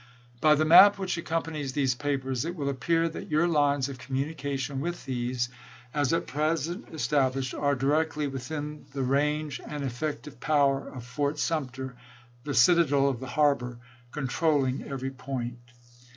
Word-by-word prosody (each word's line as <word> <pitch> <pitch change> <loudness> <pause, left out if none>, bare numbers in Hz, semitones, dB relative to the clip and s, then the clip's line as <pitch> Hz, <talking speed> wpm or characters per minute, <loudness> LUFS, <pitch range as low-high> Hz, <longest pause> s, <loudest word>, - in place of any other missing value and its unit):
By 155 +2 +5
the 155 +2 +2
map 190 +6 +9
which 190 -2 -2
accompanies 160 -4 -3
these 135 -3 +2
papers 135 -2 -2
it 170 +2 -4
will 140 -4 -2
appear 165 +5 +1
that 165 - -7
your 155 +3 +3
lines 145 -4 +2
of 135 -2 -8
communication 140 0 -3
with 175 +3 -4
these, 125 -1 -1 0.5
as 145 -3 +1
at 165 - +1
present 155 +3 -1
established, 135 -2 0
are 145 -1 +1
directly 150 +3 +1
within 145 +3 -5
the 135 -1 -2
range 150 +2 0
and 150 -1 -5
effective 135 0 -4
power 140 -1 +2
of 125 -3 -9
Fort 145 +3 -1
Sumter 130 -5 -2 0.2
— 120 0 -28
the 145 -2 -2
citadel 140 0 +5
of 130 -4 -3
the 130 - -7
har 145 +2 +4
bor— 125 -3 -7 0.3
controlling 140 -1 0
every 135 -1 -4
point. 125 -2 -5
140 Hz, 155 wpm, -28 LUFS, 130-155 Hz, 0.5 s, map